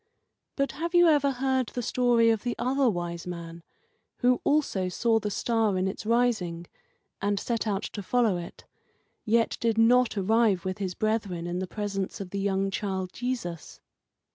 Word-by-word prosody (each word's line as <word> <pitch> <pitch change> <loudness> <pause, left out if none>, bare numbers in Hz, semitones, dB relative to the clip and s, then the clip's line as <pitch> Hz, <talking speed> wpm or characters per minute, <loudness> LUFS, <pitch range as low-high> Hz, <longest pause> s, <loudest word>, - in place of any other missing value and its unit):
But 275 -1 0
have 335 +3 -4
you 350 0 +7
ever 290 -3 +4
heard 260 -1 0
the 245 - -4
story 240 -1 +3
of 220 -2 0
the 240 -1 -2
Other 260 +2 +2
Wise 175 -3 -4
Man, 170 -1 -7 0.6
who 250 -1 +3
also 240 -11 +1
saw 225 +4 +2
the 210 -1 -3
star 220 -1 0
in 185 +1 0
its 195 +2 -5
rising, 220 -8 +1 0.6
and 200 0 0
set 230 -2 -2
out 200 -1 -1
to 205 - -5
follow 225 0 +2
it, 175 0 -9 0.6
yet 230 +1 +2
did 230 -1 0
not 235 0 +4
arrive 205 -1 +2
with 185 +1 -3
his 185 -3 -3
brethren 210 -6 -1
in 175 +1 -3
the 185 - -3
presence 200 -1 -4
of 190 -3 -7
the 200 - -3
young 195 0 0
child 190 -2 -3
Jesus? 235 -10 -5
215 Hz, 170 wpm, -27 LUFS, 190-245 Hz, 0.6 s, you